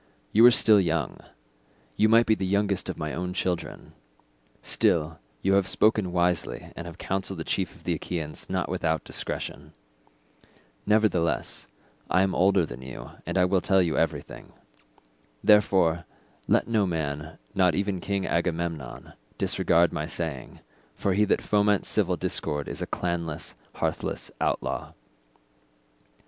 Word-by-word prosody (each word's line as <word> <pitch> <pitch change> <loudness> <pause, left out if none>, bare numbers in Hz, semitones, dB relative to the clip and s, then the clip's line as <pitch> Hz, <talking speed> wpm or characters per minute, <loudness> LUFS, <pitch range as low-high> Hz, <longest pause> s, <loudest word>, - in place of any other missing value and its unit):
You 110 - +5
are - - +10
still 110 -3 +6
young—you - - -3
might 115 +1 +6
be 110 - +4
the 105 - -2
youngest 100 0 0
of - - -4
my 75 -2 -4
own 90 +1 -3
children—still 65 0 -2 0.2
you 95 - +3
have 100 -1 +3
spoken 105 -1 +2
wisely 90 -1 -1
and 85 - -7
have 85 - -9
counselled 95 0 -2
the 80 - -4
chief - - -2
of - - -18
the - - 0
Achaeans 80 -4 -5
not - - -1
without 80 -1 -1
discretion; - - -5 1.1
nevertheless 105 -6 +1 0.4
I 90 +2 +4
am 95 - 0
older 95 -1 +3
than - - -9
you 65 -1 -9 0.2
and 85 +2 -1
I 90 - +5
will 90 0 +2
tell 95 -1 +3
you 85 -4 +1
everything; 80 - -3 0.9
therefore 95 -5 +4 0.4
let - - +3
no 110 -4 +2
man, 80 -2 -3 0.2
not 90 -4 +3
even 100 -2 -1
King 100 -1 -2
Agamemnon, 85 -6 -3 0.2
disregard 85 0 +2
my 75 - -3
saying, 75 -7 -5 0.3
for 100 - 0
he 105 +3 +3
that 105 - +1
foments 105 -1 +2
civil - - +1
discord 75 -1 -2
is - - -5
a - - -2
clanless, 85 -3 -3 0.2
hearthless - - -3
outlaw. - - -2
90 Hz, 140 wpm, -26 LUFS, 80-100 Hz, 1.1 s, are